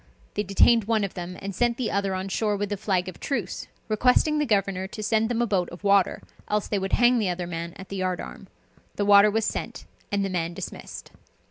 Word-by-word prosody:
They 210 - 0
detained 210 +3 +4
one 220 -1 +1
of 200 - -3
them, 180 0 -6
and 200 0 -4
sent 240 +4 +1
the 245 -4 -1
other 195 -1 0
on 185 +1 -3
shore 210 +1 0
with 205 0 -3
a - - 0
flag 190 -2 -1
of 185 - -8
truce, 230 -10 -3 0.2
requesting 250 +7 +3
the 295 - 0
governor 195 -3 0
to 215 +2 -7
send 220 +1 +1
them 240 0 +1
a - - +2
boat 190 -5 0
of 175 +4 -11
water, 200 -1 +3 0.2
else 210 -1 0
they 205 - 0
would 190 0 -4
hang 245 0 +5
the 205 -4 0
other 180 0 -2
man 170 0 -5
at 190 - -10
the 195 - -5
yard 185 -1 -1
arm. - - -9 0.5
The 205 - 0
water 205 +1 +7
was 220 +1 0
sent, - - -4 0.3
and 200 -1 +1
the - - -2
man 170 -1 -2
dismissed. - - -8
200 Hz, 235 wpm, -25 LUFS, 185-220 Hz, 0.5 s, water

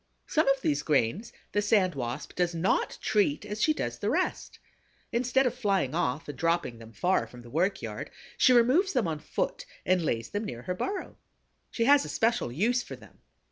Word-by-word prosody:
Some 310 -1 +1
of 275 -1 +3
these 145 - +1
grains 150 - 0 0.2
the 205 - +1
Sand 205 -3 +3
Wasp 125 +1 -5
does 175 -1 0
not 170 +3 0
treat 205 -5 +1
as 210 +1 -5
she 310 - +4
does 305 - -3
the - - -1
rest. - - -1 0.5
Instead 255 +3 +2
of 250 - +1
flying 200 - 0
off 130 +6 -1
and 145 - -6
dropping 165 -6 0
them 115 0 -12
far 180 +11 +1
from 125 -1 -13
the 120 - -13
work 180 +7 0
yard, - - -5 0.3
she 255 - +5
removes 255 - +4
them 250 - +1
on 155 -2 -3
foot - - -3 0.2
and 185 -1 +3
lays 115 -8 -2
them 205 +1 -2
near 120 - -6
her 180 - -2
burrow. 390 - -4 0.5
She 230 - -1
has 280 +2 +6
a - - -6
special 230 - +1
use 230 - +1
for - - -8
them. - - -18
190 Hz, 200 wpm, -28 LUFS, 150-245 Hz, 0.5 s, has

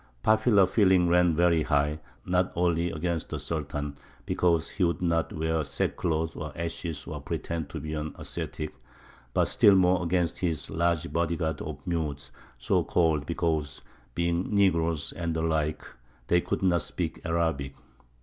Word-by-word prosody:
Popular 110 -2 +5
feeling 95 -4 +4
ran 90 -1 +4
very 85 -1 +3
high, 75 0 +1 0.3
not 90 +1 +1
only 85 -1 +1
against 85 0 -2
the - - -3
Sultan, 75 -2 -4 0.3
because 85 -2 +1
he 95 - -2
would 85 -1 +1
not 85 -2 0
wear 80 0 -1
sackcloth 80 +2 -1
and 75 0 -5
ashes 85 -1 -4
or - - -6
pretend 80 -3 -4
to 80 - -5
be 75 +1 -5
an 75 0 -4
ascetic, 75 - -5 0.6
but - - +4
still 100 - +5
more 90 -1 +4
against 85 0 0
his 80 -5 -2
large 85 0 0
body 85 0 +1
guard 80 -1 -2
of 75 -2 -7
"Mutes," 75 -6 -3 0.3
so - - +1
called 80 -4 +1
because, 80 -4 -1 0.3
being 85 +1 0
negroes 85 -6 +2
and 85 -2 -3
the 80 - -1
like, 80 -1 0 0.5
they 85 0 +4
could - - -3
not 85 -2 +3
speak 85 -2 -4
Arabic. 80 -5 -1
85 Hz, 155 wpm, -28 LUFS, 80-85 Hz, 0.6 s, Popular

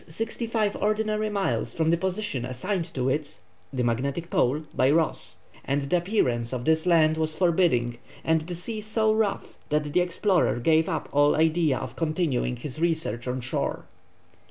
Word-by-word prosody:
sixty 225 +7 -3
five 215 -3 0
ordinary 215 0 0
miles 200 -2 -1
from 160 0 +2
the - - +4
position 190 - -2
assigned 165 +8 -3
to 130 -3 -2
it 145 -2 -2 0.3
(the 125 -2 -1
magnetic 135 +8 -1
pole) 140 +5 +2
by 130 - +3
Ross, 160 +1 0 0.3
and 140 +1 -1
the 140 +5 0
appearance 130 - 0
of 125 -1 -4
this 160 +2 +2
land 160 -2 +4
was 155 0 -1
forbidding 160 -10 +2 0.2
and 160 0 +2
the 175 - -4
sea 215 +5 -4
so 215 0 +1
rough 215 -2 -1
that 150 -1 0
the 180 - +4
explorer 180 - +1
gave 160 +7 +2
up - - -2
all 145 +1 +4
idea 160 -3 +2
of - - -6
continuing 155 -6 0
his 130 +4 -7
researches 160 -9 -1
on 125 +1 -2
shore. 120 - -3
160 Hz, 170 wpm, -26 LUFS, 135-185 Hz, 0.3 s, the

